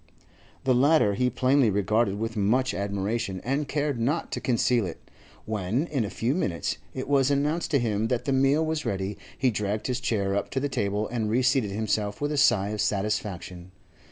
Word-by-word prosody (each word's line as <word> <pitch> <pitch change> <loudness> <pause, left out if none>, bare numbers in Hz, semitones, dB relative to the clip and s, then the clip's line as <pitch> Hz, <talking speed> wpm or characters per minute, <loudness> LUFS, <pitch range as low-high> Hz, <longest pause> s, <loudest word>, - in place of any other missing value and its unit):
The 130 - +3
latter 135 -4 +4
he 125 +5 +1
plainly 130 0 +3
regarded 100 +1 +1
with 115 +1 -3
much 120 +6 +1
admiration, 100 +1 -2
and 140 +3 -1
cared 145 -4 -1
not 145 +8 -1
to - - -3
conceal 120 -3 +2
it. 85 - -7 0.5
When, 110 - -1
in 140 -8 -1
a 105 - -3
few 120 +6 -1
minutes, 95 - -2 0.2
it 130 - -4
was 140 -2 +3
announced 145 +4 0
to 145 - +3
him 110 -2 0
that 125 +1 -1
the 140 - +1
meal 135 +4 +3
was 160 -1 -2
ready, 95 +1 -2 0.2
he 130 -1 +2
dragged 105 0 -2
his 125 -1 -1
chair 100 -5 0
up 100 - -1
to 135 - -1
the 145 +2 -1
table 105 -4 -1
and 115 -2 -2
reseated 125 -1 +2
himself 105 0 -1
with 145 +1 -1
a 150 - -1
sigh 120 -9 +4
of 105 0 -2
satisfaction. 95 -3 -2
115 Hz, 190 wpm, -26 LUFS, 100-135 Hz, 0.5 s, latter